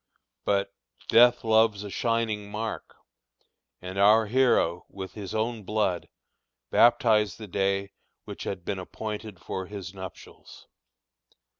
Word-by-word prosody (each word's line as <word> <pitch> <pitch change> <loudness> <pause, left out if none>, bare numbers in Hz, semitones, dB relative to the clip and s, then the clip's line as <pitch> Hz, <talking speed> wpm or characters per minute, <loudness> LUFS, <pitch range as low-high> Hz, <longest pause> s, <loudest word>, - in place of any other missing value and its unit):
But 100 -1 0 0.4
"death 120 +1 +6
loves 110 -2 +3
a 100 - -7
shining 115 -3 -1
mark," 110 +1 -5 0.9
and 95 +2 -5
our 110 +3 +6
hero, 110 -7 +2
with 95 -1 -8
his 100 -3 -7
own 110 +1 -1
blood, 100 -3 -1 0.6
baptized 110 -4 +4
the 110 - -8
day 100 0 -1 0.3
which - - -7
had 90 -3 -5
been 100 -2 -2
appointed 105 +1 -6
for 95 -1 -5
his 100 -2 -7
nuptials. 95 -2 -11
105 Hz, 120 wpm, -27 LUFS, 95-110 Hz, 0.9 s, death